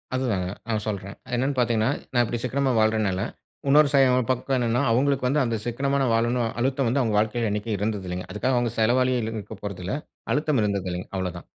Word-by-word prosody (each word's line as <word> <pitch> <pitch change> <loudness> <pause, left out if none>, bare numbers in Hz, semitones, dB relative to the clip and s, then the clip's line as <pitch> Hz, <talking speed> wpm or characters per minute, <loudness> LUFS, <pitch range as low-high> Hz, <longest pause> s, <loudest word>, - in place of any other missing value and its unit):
அதுதாங்க. 110 -9 0 0.2
நான் 110 -2 -1
சொல்றேன். 100 -2 -4
அது - - -8
என்னன்னு 130 +3 0
பார்த்தீங்கன்னா, 115 -2 +2 0.2
நான் 120 -1 +4
இப்படி 120 +1 -3
சிக்கனமா 135 +2 +1
வாழ்றனால 110 -4 +2 0.5
இன்னொரு 145 +1 +6
சயம் 130 -3 +4
பக்கம் 130 +1 0
என்னன்னா, 120 -1 +1
அவுங்களுக்கு 135 +2 +2
வந்து, 140 +4 +2
"அந்த 115 -2 0
சிக்கனமா 135 +4 0
நான் 130 -3 +2
வாழணும்." 120 +1 +1
அழுத்தம் 135 +2 +1
வந்து 125 +5 +1
அவுங்க 110 -4 0
வாழ்க்கையில 110 +1 +1
என்னைக்கும் 105 +1 -2
இருந்தது 105 -1 -2
இல்லேங்க. 90 +1 -4
அதுக்காக 130 +5 0
அவுங்க 120 -1 +1
செலவாளியே 125 +3 +3
இல்லேன்னு 110 0 -3
இருக்கப் 100 0 -11
போறதில்ல. 95 -2 -4 0.4
அழுத்தம் 150 -2 +1
இருந்ததில்லேங்க, 95 -3 -2
அவ்வளோதான். 90 -2 -4
115 Hz, 185 wpm, -25 LUFS, 105-130 Hz, 0.5 s, இன்னொரு